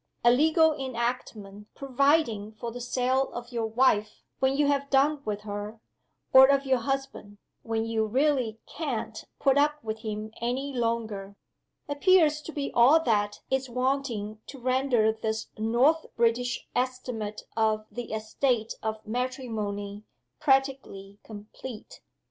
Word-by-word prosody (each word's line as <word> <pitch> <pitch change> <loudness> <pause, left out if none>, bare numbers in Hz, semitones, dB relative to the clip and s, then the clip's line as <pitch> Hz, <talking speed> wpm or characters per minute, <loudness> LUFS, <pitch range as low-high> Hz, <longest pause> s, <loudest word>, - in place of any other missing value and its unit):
A 240 - +7
legal 315 +4 +4
enactment 235 -6 -4
providing 270 -6 +1
for 230 +2 -6
the 245 +1 -7
sale 255 +2 0
of 240 +1 -7
your 230 -2 -1
wife, 220 -2 +1 0.2
when 265 +1 +2
you 295 - +3
have 280 -1 0
done 285 +2 +3
with 210 -1 -3
her, 210 +1 -6 0.5
or 265 0 +10
of 275 0 +2
your 260 -2 +2
husband; 270 -5 -4 0.2
when 225 0 -2
you 225 -1 0
"really 255 -2 +1
can't 235 -8 -4
put 275 0 +3
up 295 +1 +3
with 220 0 -4
him 215 0 -5
any 260 +4 -2
longer," 225 -5 -2 0.5
appears 305 0 +3
to 325 - -8
be 285 -3 -3
all 260 +7 +6
that 205 -4 0
is 265 -1 0
wanting 250 -4 -2
to 280 - -9
render 255 -3 +2
this 220 0 -3
North 240 +9 +2
British 235 +1 0
estimate 250 -4 -3
of 215 -1 +1
the 245 -1 -6
"Estate 220 +1 -1
of 220 0 -4
Matrimony" 215 -4 -3 0.4
practically 265 -8 0
complete. 215 +2 -10
240 Hz, 135 wpm, -27 LUFS, 220-270 Hz, 0.5 s, or